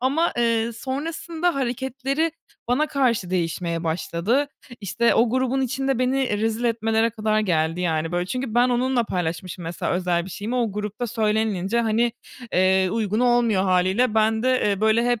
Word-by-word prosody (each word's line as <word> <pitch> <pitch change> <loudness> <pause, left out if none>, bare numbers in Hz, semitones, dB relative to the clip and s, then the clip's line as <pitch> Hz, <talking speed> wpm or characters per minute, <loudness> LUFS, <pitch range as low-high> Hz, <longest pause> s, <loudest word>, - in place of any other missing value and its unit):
ama, 280 +7 +1
eee, 230 -1 +1
sonrasında 320 +7 -3
hareketleri 270 +4 -1 0.4
bana 290 +5 +2
karşı 240 -11 0
değişmeye 170 -1 -2
başladı. 180 - 0 0.3
İşte, 235 +4 +1
o 230 0 +3
grubun 260 +1 0
içinde 270 0 -1
beni 260 +2 +1
e 210 -4 -1
rezil 225 +2 -1
etmelere 225 0 +1
kadar 215 -1 0
geldi 165 -3 0
yani, 165 -1 -1
böyle. 175 0 -1
Çünkü 255 0 -4
ben 245 +1 +4
onunla 250 0 +1
paylaşmışım 175 -1 -4
mesela 165 +1 -3
özel 175 -1 0
bir 190 - -9
şeyimi, 210 +7 -4
o 230 -5 0
grupta 210 +3 -4
söylenilince 220 -1 0
hani, 230 +1 +1 0.4
eee, 185 0 +3
uygun 220 0 -1
olmuyor 240 -5 +3
hâliyle. 190 +5 +2
Ben 220 +1 +2
de, 255 - +2 0.2
eee, 200 0 -1
böyle, 220 +2 +3
hep 240 -3 +1
225 Hz, 160 wpm, -23 LUFS, 190-250 Hz, 0.4 s, ben